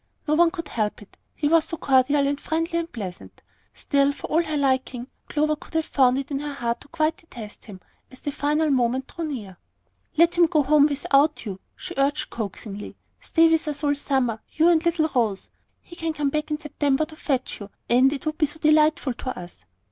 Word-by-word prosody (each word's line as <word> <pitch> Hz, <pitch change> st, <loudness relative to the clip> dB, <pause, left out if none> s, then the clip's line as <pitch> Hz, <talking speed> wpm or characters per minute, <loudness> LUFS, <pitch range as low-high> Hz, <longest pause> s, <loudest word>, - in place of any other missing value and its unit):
No 300 Hz, -, +2 dB
one 335 Hz, +2 st, +5 dB
could 335 Hz, -3 st, -7 dB
help 210 Hz, -2 st, -2 dB
it, -, -, -21 dB, 0.2 s
he 295 Hz, -, 0 dB
was 325 Hz, +1 st, +4 dB
so 330 Hz, -, -5 dB
cordial 280 Hz, -1 st, +3 dB
and 285 Hz, 0 st, -1 dB
friendly 330 Hz, +2 st, -1 dB
and 335 Hz, 0 st, -5 dB
pleasant. 190 Hz, -6 st, -8 dB, 0.3 s
Still, 280 Hz, -1 st, +1 dB
for -, -, -8 dB
all 325 Hz, +2 st, +4 dB
her 310 Hz, -3 st, -2 dB
liking, 260 Hz, -3 st, 0 dB, 0.2 s
Clover 305 Hz, +1 st, +1 dB
could 305 Hz, -, -15 dB
have 320 Hz, -1 st, +1 dB
found 255 Hz, -2 st, +3 dB
it 275 Hz, +1 st, -4 dB
in 275 Hz, -, -1 dB
her 290 Hz, 0 st, -5 dB
heart 235 Hz, -1 st, -2 dB
to -, -, -14 dB
quite 310 Hz, +1 st, 0 dB
detest 240 Hz, -, -11 dB
him 200 Hz, -4 st, -10 dB, 0.3 s
as 255 Hz, -, -14 dB
the 290 Hz, -, -3 dB
final 300 Hz, +2 st, +1 dB
moment 255 Hz, 0 st, +1 dB
drew 335 Hz, -, -3 dB
near. 210 Hz, -, -6 dB, 0.6 s
"Let 335 Hz, +1 st, +5 dB
him 345 Hz, -1 st, +5 dB
go 310 Hz, -3 st, +2 dB
home 290 Hz, +1 st, +5 dB
without 285 Hz, 0 st, +2 dB
you," 195 Hz, -3 st, -5 dB, 0.2 s
she 365 Hz, -, -7 dB
urged 280 Hz, +2 st, 0 dB
coaxingly. 205 Hz, -1 st, -6 dB, 0.2 s
"Stay 330 Hz, -1 st, +3 dB
with 325 Hz, -1 st, +2 dB
us 295 Hz, 0 st, -3 dB
all 290 Hz, -1 st, +3 dB
summer, 265 Hz, -6 st, 0 dB
you 320 Hz, +2 st, +4 dB
and 330 Hz, -2 st, +3 dB
little 340 Hz, -2 st, +2 dB
Rose! 220 Hz, -6 st, 0 dB, 0.3 s
He 345 Hz, -, -12 dB
can 325 Hz, -2 st, -2 dB
come 295 Hz, -2 st, 0 dB
back 305 Hz, +1 st, -2 dB
in 300 Hz, 0 st, -2 dB
September 295 Hz, -1 st, 0 dB
to 315 Hz, -, -13 dB
fetch 265 Hz, -4 st, -2 dB
you, 205 Hz, -1 st, -8 dB, 0.2 s
and 255 Hz, +3 st, +5 dB
it 280 Hz, 0 st, -5 dB
would 310 Hz, +1 st, -3 dB
be 305 Hz, -, +3 dB
so 295 Hz, -, -6 dB
delightful 305 Hz, -3 st, +3 dB
to 255 Hz, +2 st, -6 dB
us." 175 Hz, -, -12 dB
290 Hz, 215 wpm, -24 LUFS, 255-315 Hz, 0.6 s, one